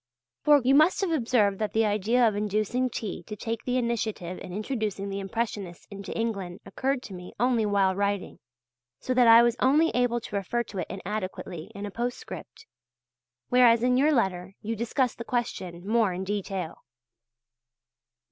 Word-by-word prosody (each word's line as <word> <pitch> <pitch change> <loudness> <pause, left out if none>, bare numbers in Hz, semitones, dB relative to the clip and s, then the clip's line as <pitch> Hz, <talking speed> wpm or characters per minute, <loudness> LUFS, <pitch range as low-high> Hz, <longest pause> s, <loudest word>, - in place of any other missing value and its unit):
For 295 -1 +6
you 260 +2 +4
must 310 +8 +5
have 380 -3 0
observed 230 -9 +2
that 215 -1 -2
the 225 0 +3
idea 215 +4 +3
of 215 - 0
inducing 215 +5 0
T. 220 -4 -5
to 210 - -8
take 225 +2 -4
the 250 0 0
initiative 220 -7 -2
in - - -8
introducing 210 -1 -3
the 195 0 -3
Impressionists 195 -3 -4
into 200 0 -7
England 200 -6 -3
occurred 260 +6 -2
to 195 - -9
me 180 -1 -9
only 240 -2 +2
while 195 -2 +3
writing, 200 0 -2 0.6
so 255 - -2
that 250 -1 +5
I 230 +1 +9
was 235 -1 +2
only 300 +5 +4
able 245 -1 +1
to 225 - -8
refer 220 +5 -1
to 200 -4 -7
it 175 - -3
inadequately 190 -4 -5
in 200 +1 -5
a 205 - -6
postscript. 245 - -6 0.8
Whereas 245 -2 +5
in 250 0 +3
your 285 +4 +4
letter 190 -7 0
you 225 +2 -3
discuss 240 +3 0
the 235 - -7
question 190 -8 -3
more 220 -3 +2
in 185 +2 -4
detail. 195 -3 -4
220 Hz, 170 wpm, -27 LUFS, 195-245 Hz, 0.8 s, I